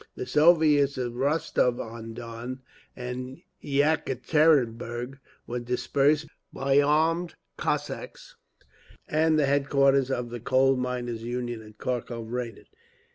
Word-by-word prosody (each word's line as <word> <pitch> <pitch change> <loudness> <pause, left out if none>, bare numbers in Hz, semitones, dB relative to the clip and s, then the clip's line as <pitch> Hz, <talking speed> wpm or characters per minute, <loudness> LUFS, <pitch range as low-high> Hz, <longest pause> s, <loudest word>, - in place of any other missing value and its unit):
The - - -5
Soviets 150 -1 +4
of 120 -2 -3
Rostov 135 -2 +1
on 115 0 -7
Don 120 +2 -7 0.3
and 125 +1 -6 0.2
Yekaterinburg 135 -3 +1 0.3
were 125 +1 -3
dispersed 140 +5 +1 0.3
by 135 +1 +2
armed 160 +4 +1 0.2
Cossacks, - - -4 0.7
and 155 +1 +2
the 150 - +3
headquarters 140 -1 +3
of 125 -3 -2
the 120 - -5
Coal 135 +3 +3
Miners' 125 -2 -3
Union 120 -1 -4
at 110 -1 -15
Kharkov 120 -2 -4
raided. 120 -2 -5
130 Hz, 110 wpm, -27 LUFS, 120-145 Hz, 0.7 s, Soviets